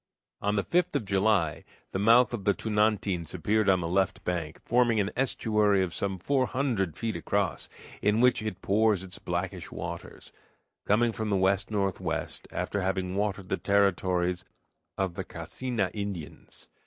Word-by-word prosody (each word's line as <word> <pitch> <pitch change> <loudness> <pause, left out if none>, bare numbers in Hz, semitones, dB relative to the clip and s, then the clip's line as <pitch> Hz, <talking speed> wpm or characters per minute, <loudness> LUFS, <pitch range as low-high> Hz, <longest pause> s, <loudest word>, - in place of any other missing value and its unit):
On 105 +1 +1
the 100 - +1
5th 180 +1 +1
of 110 - 0
July 95 -4 +1 0.3
the 95 - -2
mouth 115 +4 +5
of 110 -5 -3
the 100 0 +2
Tunantins 105 -5 0
appeared 105 +4 +1
on 95 -2 +4
the 85 - -2
left 95 +2 0
bank, 85 -3 -3
forming 120 -2 +3
an 100 0 0
estuary 105 -6 +2
of 90 -3 -3
some 95 -1 -2
four 130 +7 +1
hundred 115 - -1
feet 115 -2 -2
across, 100 -2 -1 0.3
in 105 +2 +2
which 125 -1 +4
it 105 -3 -5
pours 105 -1 +2
its 90 -2 -7
blackish - - -4
waters, - - -7 0.6
coming 115 +3 +3
from 110 0 -3
the 100 - +2
west 95 +1 +2
northwest, 100 -3 -2
after 100 - -2
having 95 0 -1
watered 100 -2 -2
the 95 - 0
territories 90 -2 +1 0.5
of 95 -2 -1
the - - -4
Cacena 120 -7 -3
Indians. 100 -7 -7
100 Hz, 160 wpm, -28 LUFS, 95-110 Hz, 0.6 s, mouth